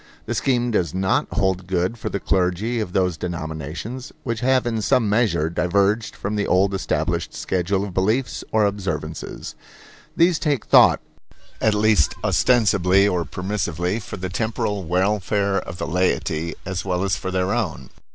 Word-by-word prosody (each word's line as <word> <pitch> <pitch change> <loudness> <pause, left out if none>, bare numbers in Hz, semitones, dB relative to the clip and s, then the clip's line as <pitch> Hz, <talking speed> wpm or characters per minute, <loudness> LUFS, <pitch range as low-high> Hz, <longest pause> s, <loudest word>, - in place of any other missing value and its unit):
The - - -2
scheme 125 -2 +1
does 90 -5 0
not 95 0 +1
hold 95 -2 0
good 90 +3 0
for 115 - -5
the 100 - -3
clergy 95 +6 0
of 105 -5 -3
those 90 -3 +1
denominations 85 - -5
which 115 -3 -2
have 130 0 +2
in 115 -2 -1
some 110 +2 +2
measure 105 -7 +2
diverged 100 +6 +1
from 105 +2 -3
the 105 - 0
old 95 +2 +3
established 95 - -1
schedule 95 +2 -1
of 100 -3 -6
beliefs 110 +8 0
or 110 -1 +3
observances. 95 -6 -4 0.6
These 170 -1 +4
take 145 -6 0
thought, - - +6 0.6
at 110 -1 +3
least 105 -7 +3
ostensibly 100 -5 +3
or 90 -4 0
permissively, 90 +3 -2
for 105 - -7
the 95 0 -4
temporal 105 -1 -2
welfare 100 +2 +1
of 85 -1 -8
the - - -3
laity, 85 -2 0
as 95 -2 -3
well 90 -1 -1
as 95 -2 +1
for 95 - -4
their 95 +1 0
own. 85 - -3
95 Hz, 160 wpm, -22 LUFS, 90-110 Hz, 0.6 s, thought